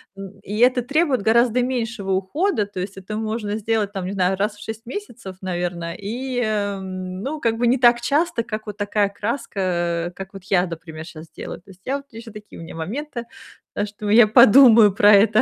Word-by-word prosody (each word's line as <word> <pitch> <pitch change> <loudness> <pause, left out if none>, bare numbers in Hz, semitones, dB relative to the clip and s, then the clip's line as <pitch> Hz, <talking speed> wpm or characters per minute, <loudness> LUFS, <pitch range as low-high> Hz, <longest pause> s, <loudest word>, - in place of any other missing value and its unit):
М, 195 0 -10
и 205 +2 -5
это 250 0 +4
требует 280 -3 +1
гораздо 235 +2 +3
меньшего 230 -6 -2
ухода. 210 - 0
То 200 -2 -8
есть 190 +2 -5
это 200 +3 -6
можно 215 -1 -3
сделать, 220 -1 -1
там 195 -3 -5
не 190 - -4
знаю, 190 -1 +1
раз 205 +1 -1
в 205 - -12
6 220 +2 -7
месяцев, 240 - -8
наверное, 175 -2 -3
и, 245 +5 -4
эм, 190 -2 -4
ну 300 +2 -4
как 225 -1 0
бы 240 - 0
не 255 +3 +3
так 240 -1 +5
часто, 285 -2 0
как 215 -1 -6
вот 205 -1 -7
такая 205 0 0
краска, 180 -6 -2
как 195 0 -9
вот 195 -2 -10
я, 185 -2 +2
например, 160 -1 -8
щас 160 -1 -11
делаю. - - -8
То 195 - -17
есть 185 0 -19
я 275 +2 -1
вот 280 - -12
еще 225 0 -10
такие 210 -3 -12
у - - -8
меня 165 - -10
моменты. 235 - -5 0.5
Так 205 - -2
что 205 +1 -8
я 220 0 +7
подумаю 220 -2 +7
про 205 +1 +5
это. 215 +2 +5
210 Hz, 205 wpm, -21 LUFS, 190-235 Hz, 0.5 s, я